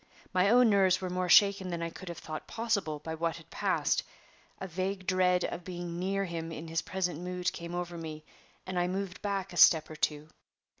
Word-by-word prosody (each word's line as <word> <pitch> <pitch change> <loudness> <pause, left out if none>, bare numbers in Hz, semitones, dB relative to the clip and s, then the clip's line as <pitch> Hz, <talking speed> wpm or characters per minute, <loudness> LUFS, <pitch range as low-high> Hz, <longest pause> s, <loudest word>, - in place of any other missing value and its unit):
My 185 +2 +4
own 245 +2 +6
nerves 190 -2 +4
were 185 -1 -4
more 180 0 -1
shaken 200 0 +6
than 170 -1 -3
I 165 - -3
could 185 +1 -9
have 170 - -6
thought 155 0 -7
possible 205 -9 -1
by 160 +2 -6
what 165 +1 -1
had 165 -1 -14
passed. - - +1 0.6
A - - -4
vague 185 +2 -3
dread 180 -1 +3
of 175 - -5
being 175 -1 -5
near 195 +2 0
him 165 -2 -5
in 165 0 -7
his 165 0 0
present 180 -4 -2
mood 180 0 -2
came 170 +1 -6
over 175 -1 -4
me, 155 -1 -7 0.4
and 185 -1 -2
I 175 - +1
moved 190 0 -4
back 195 -2 -2
a - - -7
step 160 -1 +6
or - - -7
two. 150 0 -1
180 Hz, 210 wpm, -30 LUFS, 165-190 Hz, 0.6 s, own